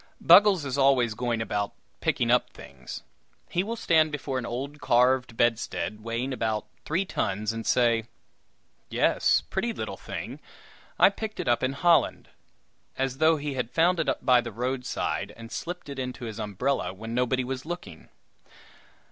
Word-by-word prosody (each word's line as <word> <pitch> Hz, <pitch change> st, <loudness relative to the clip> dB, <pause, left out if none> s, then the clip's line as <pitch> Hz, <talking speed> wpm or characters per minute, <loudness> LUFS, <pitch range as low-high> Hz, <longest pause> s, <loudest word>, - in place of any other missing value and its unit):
Buggles 185 Hz, -2 st, +6 dB
is 140 Hz, 0 st, -2 dB
always 130 Hz, -4 st, +4 dB
going 115 Hz, 0 st, -1 dB
about 105 Hz, -2 st, -2 dB, 0.3 s
"picking -, -, +1 dB
up" -, -, +3 dB
things. 65 Hz, -2 st, -10 dB, 0.5 s
He 175 Hz, -, +1 dB
will 225 Hz, +3 st, -3 dB
stand 160 Hz, -8 st, +3 dB
before 135 Hz, -3 st, -3 dB
an 120 Hz, -, -5 dB
old 140 Hz, +5 st, -5 dB
carved 125 Hz, -1 st, +2 dB
bedstead, 115 Hz, -2 st, 0 dB
weighing 115 Hz, +4 st, -2 dB
about 110 Hz, -3 st, -1 dB, 0.2 s
three 175 Hz, +6 st, 0 dB
tons, 105 Hz, -, -2 dB
and 115 Hz, 0 st, -5 dB
say: 115 Hz, -3 st, +3 dB, 0.8 s
"Yes -, -, +3 dB
pretty 230 Hz, +5 st, -2 dB
little -, -, -5 dB
thing! -, -, -7 dB, 0.6 s
I -, -, +6 dB
picked 215 Hz, +1 st, -6 dB
it -, -, -3 dB
up 120 Hz, -1 st, +3 dB
in 130 Hz, +1 st, 0 dB
Holland;" 170 Hz, +3 st, +2 dB, 0.7 s
as 135 Hz, 0 st, -2 dB
though 160 Hz, 0 st, +5 dB
he 145 Hz, -1 st, -4 dB
had 125 Hz, -3 st, -2 dB
found 170 Hz, +4 st, +2 dB
it 160 Hz, -, +1 dB, 0.2 s
by 125 Hz, -2 st, +6 dB
the 120 Hz, 0 st, -6 dB
roadside, 125 Hz, +3 st, -3 dB
and 115 Hz, 0 st, -10 dB
slipped 175 Hz, -1 st, -5 dB
it 140 Hz, -1 st, -6 dB
into 125 Hz, -1 st, -5 dB
his 110 Hz, -1 st, -6 dB
umbrella 110 Hz, +3 st, -1 dB
when 110 Hz, +3 st, -7 dB
nobody 125 Hz, +1 st, +1 dB
was 130 Hz, +1 st, -4 dB
looking! 150 Hz, -, -8 dB
125 Hz, 160 wpm, -27 LUFS, 115-150 Hz, 0.8 s, Buggles